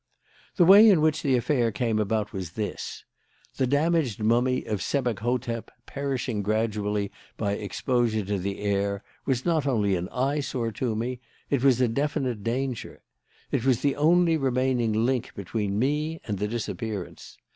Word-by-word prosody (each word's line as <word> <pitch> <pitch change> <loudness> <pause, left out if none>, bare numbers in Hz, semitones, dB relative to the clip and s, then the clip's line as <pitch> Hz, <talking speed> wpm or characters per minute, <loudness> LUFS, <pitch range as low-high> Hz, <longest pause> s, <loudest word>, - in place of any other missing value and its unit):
"The 175 - +5
way 205 +5 +9
in 190 -6 +5
which 155 +1 +2
the 135 -5 +2
affair 120 -1 +1
came 110 0 0
about 105 +1 -1
was 90 -4 -5
this: 105 0 -5 0.5
The 130 - +1
damaged 145 -4 +1
mummy 120 +4 +2
of 105 -3 -2
Sebek 125 -7 -1
hotep, 120 0 -2 0.2
perishing 130 -6 -2
gradually 105 -1 -1 0.3
by 100 -2 -1
exposure 110 +2 -1
to 100 0 -1
the 100 +2 -4
air, 100 0 -1 0.2
was 130 -2 0
not 160 -4 +1
only 105 -7 +2
an 90 +1 -3
eyesore 130 -3 -1
to 115 +1 -2
me: 120 +3 -3 0.3
it 135 -3 +1
was 130 -3 +4
a 125 - +4
definite 130 -3 -1
danger. 125 +1 -3 0.5
It - - 0
was 130 -3 +2
the 140 -1 +1
only 165 +2 +4
remaining 125 -5 +1
link 125 -2 -1
between 100 +1 -2
me 150 +6 0
and 100 -3 -3
the 105 - 0
disappearance. 110 -3 -5
120 Hz, 155 wpm, -26 LUFS, 105-135 Hz, 0.5 s, way